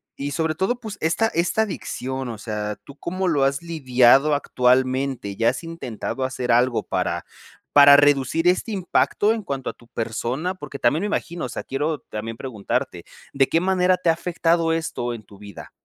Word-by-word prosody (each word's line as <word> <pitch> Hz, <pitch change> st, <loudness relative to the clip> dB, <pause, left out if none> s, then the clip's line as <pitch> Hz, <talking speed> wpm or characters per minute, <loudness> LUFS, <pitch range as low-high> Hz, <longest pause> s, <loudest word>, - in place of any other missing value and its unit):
y 140 Hz, +1 st, -4 dB
sobre 160 Hz, +2 st, -1 dB
todo, 235 Hz, +8 st, -1 dB
pues, 220 Hz, -3 st, -7 dB
esta 170 Hz, +8 st, +2 dB
esta 180 Hz, +4 st, +1 dB
adicción, 130 Hz, -, -4 dB
o 115 Hz, -, -6 dB
sea, 105 Hz, -1 st, -4 dB
¿tú 140 Hz, -, -12 dB
cómo 185 Hz, +2 st, -3 dB
lo 145 Hz, -5 st, +2 dB
has 135 Hz, +2 st, +1 dB
lidiado 135 Hz, -3 st, +4 dB
actualmente?, 130 Hz, -4 st, +1 dB
¿ya 115 Hz, +2 st, +3 dB
has 130 Hz, -, -4 dB
intentado 135 Hz, -5 st, -5 dB
hacer 130 Hz, -1 st, -2 dB
algo 120 Hz, -2 st, +2 dB
para -, -, -2 dB, 0.5 s
para 145 Hz, 0 st, +9 dB
reducir 145 Hz, +3 st, +3 dB
este 185 Hz, +5 st, +2 dB
impacto 205 Hz, +2 st, +1 dB
en 220 Hz, -3 st, -5 dB
cuanto 135 Hz, -5 st, -4 dB
a -, -, -6 dB
tu 120 Hz, -, -21 dB
persona?, 125 Hz, +10 st, -3 dB
porque 145 Hz, -5 st, -8 dB
también 145 Hz, +7 st, +2 dB
me 205 Hz, -, -1 dB
imagino, 175 Hz, -5 st, -3 dB
o -, -, -5 dB
sea, -, -, -5 dB
quiero 145 Hz, +2 st, -2 dB
también 115 Hz, +1 st, -5 dB
preguntarte, 110 Hz, -7 st, -3 dB, 0.3 s
¿de 135 Hz, -1 st, +3 dB
qué 165 Hz, -, +3 dB
manera 185 Hz, 0 st, +2 dB
te 175 Hz, -, 0 dB
ha -, -, +5 dB
afectado 165 Hz, -1 st, 0 dB
esto 160 Hz, -7 st, -2 dB
en 115 Hz, -2 st, -8 dB
tu 100 Hz, -, -17 dB
vida? 100 Hz, 0 st, -11 dB
140 Hz, 185 wpm, -23 LUFS, 125-170 Hz, 0.5 s, para